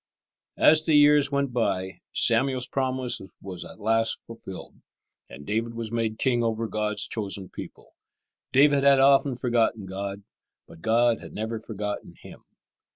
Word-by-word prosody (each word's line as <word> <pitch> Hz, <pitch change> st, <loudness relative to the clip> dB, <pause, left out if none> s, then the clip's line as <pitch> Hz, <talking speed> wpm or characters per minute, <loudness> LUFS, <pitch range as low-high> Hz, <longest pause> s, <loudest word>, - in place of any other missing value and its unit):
As 155 Hz, 0 st, +5 dB
the 155 Hz, -, +3 dB
years 145 Hz, -1 st, +5 dB
went 140 Hz, -2 st, -1 dB
by 95 Hz, -5 st, -1 dB
Samuel's 125 Hz, +2 st, +2 dB
promise 130 Hz, -2 st, -1 dB, 0.2 s
was 95 Hz, -2 st, -7 dB
at -, -, -12 dB
last 115 Hz, +1 st, +1 dB
fulfilled, 115 Hz, -5 st, -10 dB, 0.5 s
and 70 Hz, +1 st, -11 dB
David 115 Hz, +6 st, -2 dB
was 115 Hz, -1 st, -5 dB
made 115 Hz, -2 st, -1 dB
king 120 Hz, -2 st, +1 dB
over 115 Hz, 0 st, -1 dB
God's 105 Hz, -2 st, -2 dB
chosen 100 Hz, -3 st, -4 dB
people. -, -, -11 dB, 0.6 s
David 140 Hz, +1 st, +4 dB
had 140 Hz, -1 st, +6 dB
often 135 Hz, 0 st, +4 dB
forgotten 115 Hz, -4 st, 0 dB
God, 100 Hz, +1 st, -6 dB, 0.4 s
but 80 Hz, -, -15 dB
God 115 Hz, +2 st, +2 dB
had -, -, -11 dB
never 110 Hz, +1 st, -4 dB
forgotten 105 Hz, -2 st, -6 dB
him. -, -, -14 dB
115 Hz, 145 wpm, -26 LUFS, 105-130 Hz, 0.6 s, had